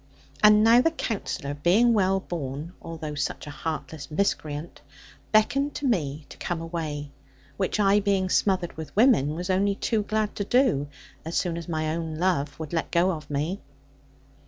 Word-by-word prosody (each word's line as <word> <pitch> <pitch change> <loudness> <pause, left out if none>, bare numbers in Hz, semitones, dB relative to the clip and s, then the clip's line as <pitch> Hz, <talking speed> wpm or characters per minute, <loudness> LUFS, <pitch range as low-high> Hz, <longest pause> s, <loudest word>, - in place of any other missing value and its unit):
And 210 0 +7
now 230 +2 +7
the 330 - +3
Counsellor, 210 - -3
being 185 +11 +3
well 195 -2 +2
born, 155 -2 -5
although 160 -2 -6
such 145 -3 -3
a 145 - -7
heartless 155 0 -5
miscreant, 155 -2 -2 0.5
beckoned 275 +7 +2
to 290 - -3
me 155 - 0
to - - -13
come 175 -2 -2
away; 155 -4 -4 0.4
which 195 +2 -1
I, 200 0 +5
being 195 -2 +1
smothered 185 -2 +1
with 155 -2 -8
women, 205 - +4
was 180 +3 -2
only 200 +2 +2
too 220 +1 0
glad 215 0 -1
to 205 - 0
do, 215 - +2 0.4
as 165 +1 -3
soon 175 -3 0
as 170 0 -6
my 155 -1 -1
own 165 -2 -4
love 155 -5 0
would 160 -1 -6
let 165 - -1
go 175 +2 +3
of 155 -4 -6
me. 150 +7 -2
175 Hz, 170 wpm, -26 LUFS, 155-205 Hz, 0.5 s, And